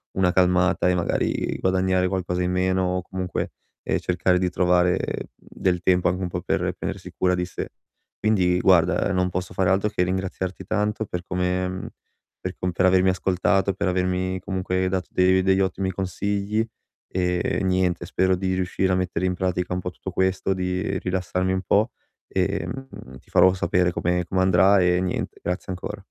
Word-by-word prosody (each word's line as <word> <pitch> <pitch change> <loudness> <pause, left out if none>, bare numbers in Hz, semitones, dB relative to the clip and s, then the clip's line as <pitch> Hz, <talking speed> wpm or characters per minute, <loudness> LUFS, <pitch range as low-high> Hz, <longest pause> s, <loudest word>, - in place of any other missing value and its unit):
una 95 -1 +3
calmata 90 0 +3
e 90 - +3
magari 85 -1 -1
guadagnare 95 0 +2
qualcosa 90 -1 -1
in 90 - 0
meno 95 0 +1
o - - -2
comunque, 95 0 -4 0.3
ehm, - - 0
cercare 90 0 +1
di 90 -1 +1
trovare 90 0 +3 0.4
del 90 -2 -2
tempo 90 0 +3
anche 90 +1 -2
un 90 - -1
po' 90 0 -4
per 90 - -1
prendersi - - -5
cura 90 0 +2
di 90 0 -1
sé. 90 - -6 0.5
Quindi, 90 -5 +2
guarda, 90 +1 +3
non 90 0 +1
posso 90 0 -4
fare 95 -1 +2
altro 100 +2 +2
che 90 -3 0
ringraziarti 95 0 -3
tanto 105 +1 -1
per 90 -2 -5
come 90 0 -1
mhmm, 95 0 -5 0.5
per 95 0 -4
com 90 0 -1
per 95 +1 +1
avermi 95 0 +4
ascoltato, 95 +1 +1
per 95 - -2
avermi 90 0 0
comunque 95 0 -1
dato 95 -1 -2
de 95 0 +4
degli 95 0 +3
ottimi 95 0 -1
consigli, 100 +3 -1 0.5
ehm, 90 -1 0
e - - -1
niente 90 -2 +1
spero 95 0 +1
di 95 0 -1
riuscire 95 0 0
a - - +3
mettere 90 -1 -1
in 90 - +1
pratica 90 0 -1
un 90 - -1
po' 90 - -3
tutto 95 +2 -7
questo, 95 +1 +1
di 95 +1 -2
rilassarmi 90 0 -1
un 95 - -1
po' 105 +6 +2 0.4
e, 95 +1 -1
mhmm, 130 - -9
ti - - -26
farò 95 - +6
sapere 90 0 +1
come 90 +1 0
come 95 +1 0
andrà 95 +2 +5
e 90 0 +3
niente, 90 -1 -3
grazie 90 +2 -3
ancora. 90 - -6
90 Hz, 180 wpm, -24 LUFS, 90-95 Hz, 0.5 s, farò